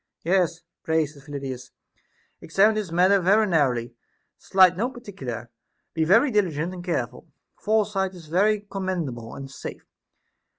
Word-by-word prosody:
Yes, 175 -1 +1 0.2
pray, 160 -1 +1
said 145 -1 -13
Phyllidas, 135 -3 -6 0.7
examine 200 +6 +3
this 210 -5 -3
matter 185 +4 +4
very 205 +5 +4
narrowly; 130 - +1 0.5
slight 185 -2 +5
no 230 +7 -1
particular, 135 - -7 0.4
be 160 -1 +1
very 230 - +5
diligent 175 -5 0
and 180 -1 -8
careful, 175 -2 -3 0.3
foresight 210 -3 0
is 170 -3 -12
very 200 +6 +2
commendable 175 - -4
and 135 -1 -8
safe. - - -8
175 Hz, 130 wpm, -25 LUFS, 145-200 Hz, 0.7 s, slight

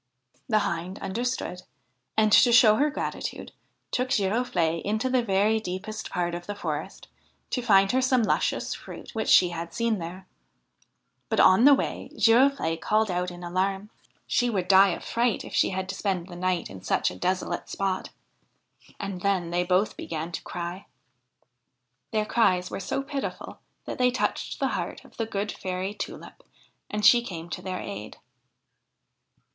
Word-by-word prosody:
The 215 - +4
Hind 175 +2 -3
understood, 230 -4 -3 0.6
and, 215 -1 +4
to 240 - +7
show 225 -3 +7
her 295 +2 +3
gratitude, 290 - -5 0.4
took 250 +1 0
Giroflee 195 -7 +1
into 220 +5 -1
the 255 -1 +3
very 210 0 +2
deepest 215 +2 -5
part 175 -2 -1
of 175 0 -6
the 205 - -4
forest 200 - -5 0.4
to 250 - 0
find 195 -4 +4
her 260 - +2
some 255 -2 +3
luscious - - 0
fruit - - -10
which 220 -2 -2
she 180 - +7
had 170 0 -6
seen 230 -3 0
there; 180 +3 -7 1.0
but - - 0
on 190 +7 +6
the 285 0 +9
way - - -4
Girofle'e 225 -6 +3
called 215 -2 +1
out 180 0 -1
in 175 0 -10
alarm: 190 +4 -1 0.3
she 245 0 +1
would 190 -5 -1
die 195 +1 +7
of 175 - -3
fright 235 -1 0
if - - -10
she - - +3
had 185 0 -3
to - - -2
spend 190 -3 -2
the 175 - -9
night 180 0 -1
in 95 -1 -10
such - - +1
a - - -9
desolate 180 - -2
spot; 195 -1 -2 0.9
and 195 -3 -5
then 185 -4 0
they 175 +1 +1
both 185 +3 +1
began 165 +1 -5
to 165 - -4
cry. 175 +2 -6 1.2
Their 215 -1 0
cries 185 -6 +2
were - - -4
so 270 +8 -2
pitiful 275 0 -5 0.3
that - - -6
they 250 0 +4
touched 250 - -2
the - - +1
heart - - -4
of - - -19
the 225 - -2
good 205 -1 -2
Fairy 185 +2 -4
Tulip, 360 - -8 0.5
and 210 0 -1
she 240 +2 +8
came 170 -5 -7
to - - -4
their 185 -1 -4
aid. 105 +2 -7
195 Hz, 170 wpm, -26 LUFS, 180-225 Hz, 1.2 s, the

